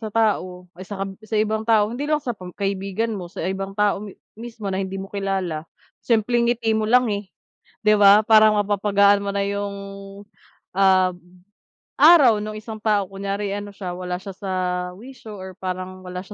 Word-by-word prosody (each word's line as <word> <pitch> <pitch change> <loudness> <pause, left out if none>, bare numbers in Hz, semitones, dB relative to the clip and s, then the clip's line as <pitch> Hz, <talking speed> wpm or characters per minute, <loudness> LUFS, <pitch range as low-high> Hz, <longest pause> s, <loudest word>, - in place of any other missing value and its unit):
sa 220 - -4
tao, 200 -5 0
ah, 180 - -16
sa 195 0 -5
kab 195 - -6
sa 215 0 -4
ibang 215 +1 +1
tao, 215 0 +3
hindi 285 +4 -4
lang 305 -1 +2
sa 250 -4 -4
pam 185 -5 -10
kaibigan 200 +3 -2
mo, 180 -4 -6
sa 170 - -6
ibang 195 +1 -4
tao 205 -1 +2
mi 205 -2 -9 0.2
mismo 230 -3 -8
na 190 - -1
hindi 190 0 -4
mo 195 +1 -7
kilala, 190 -5 -3 0.3
simpleng 235 +1 +1
ngiti 225 -2 +1
mo 220 0 0
lang, 250 +2 +5
eh, 200 -1 -4 0.6
'di 215 - +5
ba, 205 +1 +7
parang 215 -1 +6
mapapagaan 200 0 +3
mo 200 - -2
na 200 - 0
yung, 200 0 -3 1.0
ah, 190 -1 +4 0.9
araw 280 -10 +7
nung 215 0 -5
isang 215 0 -8
tao. 210 -3 +2
Kunyari 200 +1 -3
ano 205 0 -5
siya, 185 -3 -6
wala 180 0 -4
siya 195 0 -8
sa 195 -2 -6 0.5
wisyo 225 -3 -11
or 190 0 -8
parang 185 0 -5
wala 180 0 -6
siya 210 - -11
200 Hz, 185 wpm, -22 LUFS, 190-220 Hz, 1.0 s, ba